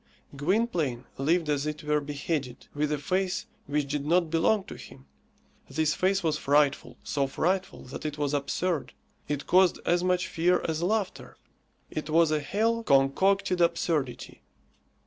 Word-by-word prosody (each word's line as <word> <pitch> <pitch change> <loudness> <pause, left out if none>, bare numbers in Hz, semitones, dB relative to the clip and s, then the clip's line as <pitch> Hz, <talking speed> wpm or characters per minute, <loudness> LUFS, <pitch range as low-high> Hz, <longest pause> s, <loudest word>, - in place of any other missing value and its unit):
Gwynplaine 155 - 0
lived 165 +4 +2
as 145 0 0
it 150 +1 -4
were 150 0 +1
beheaded, 145 -2 -4
with 150 +1 -1
a 150 - +1
face 185 +5 -1 0.2
which 145 -1 -1
did 145 -1 -1
not 165 +1 +2
belong 190 +5 +2
to - - -9
him. 65 - -13 0.6
This 155 -1 +1
face 190 +1 +1
was 155 -2 0
frightful, 145 0 +1
so 140 -1 0
frightful 185 +7 -1
that 125 - -8
it 150 -1 -4
was 145 -1 -1
absurd. 150 +4 -1 0.3
It 145 -1 -3
caused 185 0 +4
as 175 +1 +2
much 180 -1 +1
fear 175 +2 +1
as 160 0 -2
laughter. 200 +1 -2 0.5
It 155 0 -4
was 165 0 +4
a 155 - +2
hell 225 +9 0
concocted 180 +4 +2
absurdity. 165 -6 -1
155 Hz, 150 wpm, -28 LUFS, 145-180 Hz, 0.6 s, caused